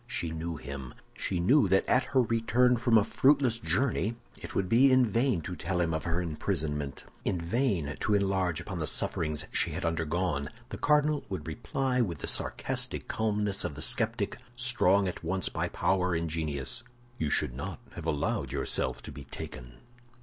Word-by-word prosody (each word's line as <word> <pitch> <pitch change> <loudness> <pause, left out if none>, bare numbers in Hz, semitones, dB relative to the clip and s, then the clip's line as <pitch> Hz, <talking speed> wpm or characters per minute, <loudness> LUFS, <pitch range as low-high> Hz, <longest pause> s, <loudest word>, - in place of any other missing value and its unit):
She 85 - -1
knew 80 +1 -4
him; 70 -3 -7 0.2
she 90 - -2
knew 110 - +4
that 95 +1 +3
at 130 - +3
her 130 0 +3
return 120 +2 +3
from 115 -1 +4
a 105 - +5
fruitless 130 -1 +3
journey 120 -3 +1 0.3
it - - -8
would 95 - +1
be 125 +7 +5
in 130 -1 +6
vain 115 -3 +1
to 90 +3 -5
tell 90 +3 -2
him 85 -2 +1
of 80 - -2
her 85 0 0
imprisonment, 75 -3 -2 0.2
in 90 - 0
vain 85 - 0
to 105 -1 +2
enlarge 95 -4 +1
upon 90 0 -5
the 75 - -1
sufferings 75 +1 0
she - - +1
had - - -3
undergone. 80 -2 -1 0.2
The - - -6
cardinal 150 0 +3
would 95 -6 -4
reply, 125 - -1
with 90 -9 -1
the - - -5
sarcastic - - -2
calmness 105 -2 0
of - - -3
the - - -7
skeptic, - - +1 0.2
strong 115 -6 +3
at 90 - -5
once 95 +3 -1
by - - -2
power 90 -2 +1
and 85 0 -1
genius, 80 - -1 0.4
"You 80 - 0
should - - +1
not 60 - -5
have - - -7
allowed 70 -3 -1
yourself 70 0 0
to - - -8
be 70 +1 -9
taken." 60 -2 -8
90 Hz, 180 wpm, -30 LUFS, 80-115 Hz, 0.4 s, in